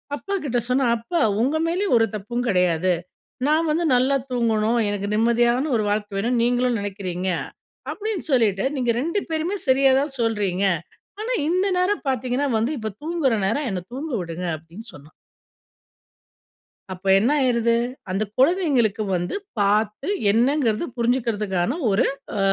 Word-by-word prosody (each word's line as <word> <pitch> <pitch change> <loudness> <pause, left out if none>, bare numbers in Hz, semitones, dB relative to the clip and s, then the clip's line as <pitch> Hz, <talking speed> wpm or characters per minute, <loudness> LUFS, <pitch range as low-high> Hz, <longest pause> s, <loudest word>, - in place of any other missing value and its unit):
அப்பாக்கிட்ட 295 -8 -2
சொன்னா, 260 +1 +2
"அப்பா 320 +9 -2 0.2
உங்க 275 +6 +1
மேலேயும் 360 -2 +1
ஒரு 225 0 +3
தப்பும் 235 +4 -3
கெடையாது. 180 -3 +2 0.5
நான் 315 +2 +2
வந்து 335 +3 0
நல்லா 260 +3 +3 0.2
தூங்கணும். 230 -1 +1
எனக்கு 205 -1 -3
நிம்மதியான 235 +5 +2
ஒரு 215 - -1
வாழ்க்க 205 0 -1
வேணும் 235 +4 0
நீங்களும் 245 0 +1
நினைக்கிறீங்க" 190 -2 -4 0.6
அப்படின்னு 430 -3 -3
சொல்லிட்டு 215 -7 +2
"நீங்க 245 -2 +1
2 335 +8 0
பேருமே 325 +5 -1
சரியா 265 +1 +5
தான் 285 -1 -4
சொல்றீங்க. 205 -5 0 0.6
ஆனா, 455 +3 -2 0.2
இந்த 365 +3 +1
நேரம் 375 +1 0
பார்த்தீங்கன்னா 255 +2 0
வந்து 225 +5 0
இப்ப 220 -2 -4
தூங்குற 315 -6 0
நேரம், 270 +7 0
என்ன 185 -2 -3
தூங்க 295 +2 -5
விடுங்க!" 170 +1 -5
அப்படின்னு 170 +9 -13
சொன்னா. 145 +1 -14 1.8
அப்ப 185 +1 -9
என்ன 225 +7 +2
ஆயிருது! 235 -3 +2 0.4
அந்த 195 +3 -1 0.2
குழந்தைங்களுக்கு 265 - +2
வந்து 175 0 -3 0.2
பார்த்து 210 +5 +1 0.2
என்னங்கறது 240 +1 +2
புரிஞ்சிக்கறதுக்கான 230 - 0
ஒரு 195 +4 +3 0.3
அ - - -1
235 Hz, 135 wpm, -23 LUFS, 205-280 Hz, 1.8 s, சரியா